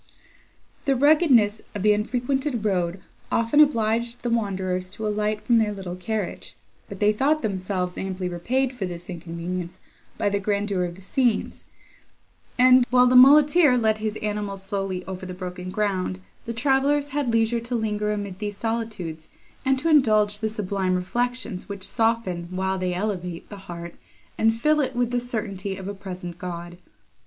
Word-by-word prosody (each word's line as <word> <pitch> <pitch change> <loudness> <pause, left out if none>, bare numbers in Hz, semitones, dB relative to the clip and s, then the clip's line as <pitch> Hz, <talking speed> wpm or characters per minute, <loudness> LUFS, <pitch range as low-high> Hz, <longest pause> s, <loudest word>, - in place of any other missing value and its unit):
The 275 -1 +3
ruggedness 260 -7 +4
of 200 - -3
the 210 0 +5
unfrequented 245 +3 -1
road 185 -2 0 0.3
often 230 +6 +2
obliged 235 -4 +2
the 240 - -1
wanderers 190 -5 -1
to 215 +3 -6
alight 210 0 -1
from 235 -2 +4
their 215 -1 +1
little 190 -3 -6
carriage, 210 +1 -4 0.3
but - - -8
they 210 0 +4
thought 290 +8 +1
themselves 185 -3 -2
amply 190 -1 -3
repaid 250 +9 -1
for 195 -6 -3
this 175 +1 -7
inconvenience 170 +1 -5 0.4
by - - 0
the 200 0 0
grandeur 200 -2 0
of 175 -1 -6
the 190 - -14
scenes; 240 +2 0 0.9
and, 255 0 +7
while 250 0 +5
the 250 0 +3
muleteer 290 +2 +7
led 220 -2 +2
his 215 0 -2
animals 205 -2 -3
slowly 195 -2 -3
over 190 -1 -7
the 180 - -6
broken 180 0 -6
ground, 185 - -1 0.3
the 230 - -3
travellers 275 +4 +2
had 285 -3 -1
leisure 230 +1 +2
to 240 +2 -4
linger 210 -2 -1
amid 200 -3 -4
these 205 -1 -4
solitudes, 215 -9 -4 0.3
and 265 -1 +2
to 290 +5 -2
indulge 215 -9 +4
the 220 -1 -1
sublime 195 -3 -1
reflections, 240 +2 -2
which 200 -1 -6
soften, 225 -7 0
while 190 +1 -1
they 180 -1 -1
elevate, 180 -3 -3
the 205 - -8
heart, 170 0 -7 0.4
and 225 0 +2
fill 305 +4 +3
it 265 -3 -1
with 245 -1 0
the 245 - +1
certainty 205 -5 -4
of 190 -1 -7
a 200 - -3
present 180 -3 -8
God! 175 -1 -6
210 Hz, 165 wpm, -24 LUFS, 185-240 Hz, 0.9 s, and